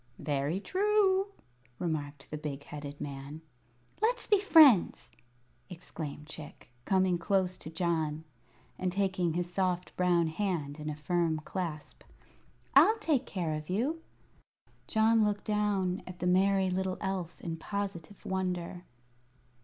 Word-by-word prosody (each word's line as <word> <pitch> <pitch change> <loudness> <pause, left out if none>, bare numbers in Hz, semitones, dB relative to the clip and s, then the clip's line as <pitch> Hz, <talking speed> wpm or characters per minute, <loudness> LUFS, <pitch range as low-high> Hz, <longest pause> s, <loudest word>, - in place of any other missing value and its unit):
"Very 145 +4 -1
true," 390 - +2 0.5
remarked 145 -3 -4
the 150 - -3
big 145 -2 -5
headed 145 0 -8
man. 140 +2 -7 0.6
"Let's 480 +3 +1
be 415 -2 +4
friends!" 310 - +6 0.6
exclaimed 160 -4 -7
Chick, 150 -5 -11
coming 185 -2 +2
close 185 0 +1
to - - -7
John 160 -2 -1 0.6
and 185 -1 0
taking 185 -3 0
his 175 +1 -3
soft 180 -1 -1
brown 175 -2 +3
hand 160 -4 -2
in 150 0 -4
a 150 - -3
firm 160 +1 0
clasp. 160 -3 -5 0.7
"I'll 445 - +7
take 290 - 0
care 170 -5 -2
of 155 +1 -5
you." 265 - 0 0.9
John 220 0 +4
looked 205 -1 -1
down 205 -3 0
at 180 -1 -8
the 175 - -4
merry 190 +1 +3
little 185 0 -1
elf 185 -4 -3
in 165 -1 -4
positive 200 0 -5
wonder. 180 -1 -3
180 Hz, 130 wpm, -31 LUFS, 155-200 Hz, 0.9 s, I'll